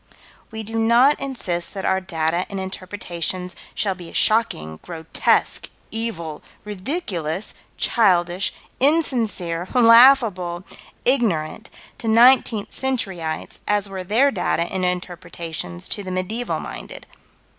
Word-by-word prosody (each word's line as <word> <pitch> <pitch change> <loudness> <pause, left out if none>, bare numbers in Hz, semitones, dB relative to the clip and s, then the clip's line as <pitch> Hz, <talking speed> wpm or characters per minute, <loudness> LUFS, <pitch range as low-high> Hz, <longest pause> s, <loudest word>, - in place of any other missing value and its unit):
We 220 -1 -6
do 225 +1 -3
not 240 +6 +5
insist 200 -11 -3
that 195 - -4
our 190 0 +2
data 165 -1 -1
and 195 - -4
interpretations 185 -2 -4 0.2
shall 200 -2 0
be 175 -2 -11
as - - -3
shocking, 80 - +1
grotesque, 165 -2 0 0.2
evil, 170 -9 -4 0.2
ridiculous, 195 - -3 0.2
childish, 180 -4 +2 0.3
insincere, 225 - +1
laughable, 230 -7 +6 0.4
ignorant 220 - 0 0.3
to 230 - -5
nineteenth 230 -2 +5
centuryites 195 -12 -2
as 205 -1 +1
were 190 -1 -6
their 235 +9 +3
data 170 - 0
and 185 +2 -3
interpretations 170 - -4
to 205 - -1
the 185 - -6
medieval 185 +7 -2
minded. - - -8
190 Hz, 115 wpm, -22 LUFS, 175-230 Hz, 0.4 s, laughable